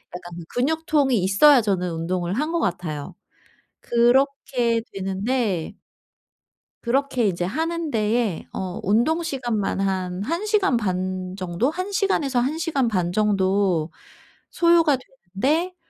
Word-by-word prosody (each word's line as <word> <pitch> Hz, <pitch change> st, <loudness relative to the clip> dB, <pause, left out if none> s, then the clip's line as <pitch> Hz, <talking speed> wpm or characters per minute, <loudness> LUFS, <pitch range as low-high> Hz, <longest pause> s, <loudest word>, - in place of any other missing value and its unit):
약간 175 Hz, -1 st, -8 dB
근육통이 290 Hz, -1 st, +1 dB
있어야 245 Hz, +9 st, +6 dB
저는 185 Hz, -4 st, -1 dB
운동을 175 Hz, +2 st, -2 dB
한 305 Hz, +6 st, -1 dB
것 340 Hz, -, 0 dB
같아요. 155 Hz, -, -3 dB, 0.7 s
그렇게 240 Hz, -1 st, +2 dB
되는데 195 Hz, -1 st, -2 dB, 1.1 s
그렇게 255 Hz, -1 st, +1 dB
이제 175 Hz, -2 st, -1 dB
하는 320 Hz, -, -2 dB
데에 215 Hz, -, 0 dB
어 185 Hz, -1 st, -4 dB
운동 240 Hz, -, +2 dB
시간만 240 Hz, -11 st, -2 dB
한 190 Hz, -1 st, -2 dB
1 335 Hz, -, -2 dB
시간 405 Hz, -, +2 dB
반 185 Hz, -2 st, -3 dB
정도? 185 Hz, +7 st, -1 dB
1 365 Hz, +5 st, -4 dB
시간에서 340 Hz, -10 st, +1 dB
1 270 Hz, +6 st, -1 dB
시간 310 Hz, -7 st, 0 dB
반 180 Hz, -5 st, 0 dB
정도 190 Hz, -4 st, +1 dB, 0.6 s
소요가 335 Hz, -4 st, +4 dB
되는데 265 Hz, -, -2 dB
230 Hz, 230 characters per minute, -23 LUFS, 185-290 Hz, 1.1 s, 있어야